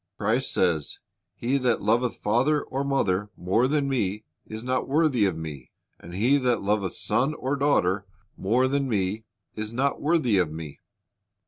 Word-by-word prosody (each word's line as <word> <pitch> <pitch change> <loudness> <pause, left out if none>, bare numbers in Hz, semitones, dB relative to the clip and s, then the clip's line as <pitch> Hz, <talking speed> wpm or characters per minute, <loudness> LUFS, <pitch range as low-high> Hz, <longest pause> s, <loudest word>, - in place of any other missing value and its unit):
Christ 115 +6 0
says, 80 -5 +1 0.4
"He 130 +4 0
that 125 -3 +1
loveth 120 +2 +2
father 130 +8 +1
or 135 +1 -3
mother 105 -8 0
more 105 +8 +2
than 145 0 +1
Me 105 -6 -1 0.2
is 110 +1 -7
not 130 0 -1
worthy 140 -6 +3
of 90 -4 0
Me, 75 -5 -7 0.3
and 85 +1 -10
he 120 +9 +3
that 125 -6 +1
loveth 100 -2 0
son 140 +5 0
or 135 +2 -2
daughter 100 -9 +1 0.3
more 120 +7 +2
than 140 0 0
Me 105 0 -1 0.3
is 110 0 -4
not 135 +4 0
worthy 145 - +2
of 85 -4 +1
Me." 80 -2 -8
115 Hz, 160 wpm, -26 LUFS, 95-135 Hz, 0.4 s, worthy